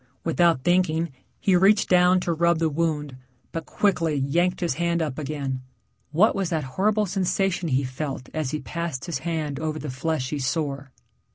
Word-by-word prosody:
Without 165 -4 +2
thinking 170 -2 +2 0.3
he 190 - +3
reached 195 +3 +5
down 180 0 +5
to 175 - 0
rub 170 +1 +3
the 160 -1 +1
wound, 150 -3 -1 0.3
but 165 -3 -5
quickly 165 -3 +1
yanked 170 +7 +1
his 175 - +1
hand 170 0 +1
up 155 -3 -2
again. 140 -3 -3 0.5
What 180 +9 +4
was 195 -3 -1
that 160 -3 -1
horrible 210 +2 +2
sensation 185 -2 0
he 135 0 +2
felt 130 0 -4
as 155 -4 -1
he 155 +2 -3
passed 170 -5 -4
his 170 -6 -3
hand 155 -3 -3
over 155 0 -2
the 150 -2 -5
fleshy 145 +1 -2
sore? 140 -1 -2
160 Hz, 170 wpm, -25 LUFS, 145-175 Hz, 0.5 s, reached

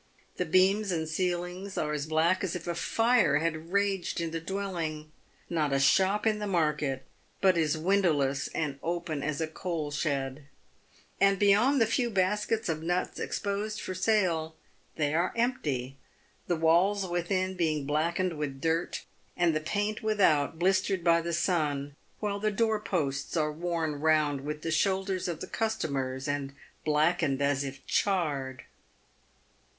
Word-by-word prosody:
The 180 - 0
beams 190 +4 +3
and 160 -2 -1
ceilings 180 +3 -2
are 150 0 -1
as 150 0 -3
black 165 +4 +2
as 185 -2 -2
if 175 - -5
a 175 - -1
fire 225 - +3
had 160 +1 -2
raged 200 -3 0
in 165 -1 -2
the 165 - -2
dwelling 165 -4 -4 0.2
— - - -35
not 155 -4 0
a 135 - +2
shop 190 +9 +3
in 215 -1 +2
the 210 - -3
market 150 -7 0 0.3
but 190 -2 +4
is 160 -2 +1
win 195 +5 +2
dowless 140 -6 +1
and 145 -3 -2
open 170 -3 -2
as 145 0 -2
a 160 - +1
coal 160 -2 -4
shed 140 -2 -2 0.4
— - - -31
and 195 0 +5
beyond 210 +8 +4
the 225 - +5
few 240 +2 0
baskets 210 +2 0
of 160 -2 -1
nuts 175 +2 -1
exposed 205 +2 -2
for 185 - -4
sale, 180 -5 +1 0.4
they 150 -2 0
are 170 +3 +1
empty, 145 - -1 0.5
the 175 - +1
walls 175 +5 +3
within 185 +2 -1
being 155 -5 0
blackened 165 +3 0
with 140 -3 -3
dirt, 165 +3 -1 0.3
and 170 -2 +3
the 155 - 0
paint 205 +7 -2
without 170 - +2
blistered 190 +1 +1
by 170 -1 +4
the 170 +1 -3
sun, 150 -5 0 0.2
while 205 -1 -2
the 215 +1 +1
door 220 +1 +1
posts 145 -7 -2
are 150 -1 +1
worn 165 -2 -2
round 155 -3 +2
with 150 +2 -5
the 165 - -2
shoulders 190 +2 0
of 170 -3 -4
the - - -3
customers, 135 -12 -2
and 140 -1 -3 0.3
blackened 155 -2 +2
as 140 0 +1
if 135 0 -7
charred. 145 -9 0
170 Hz, 160 wpm, -29 LUFS, 150-195 Hz, 0.5 s, and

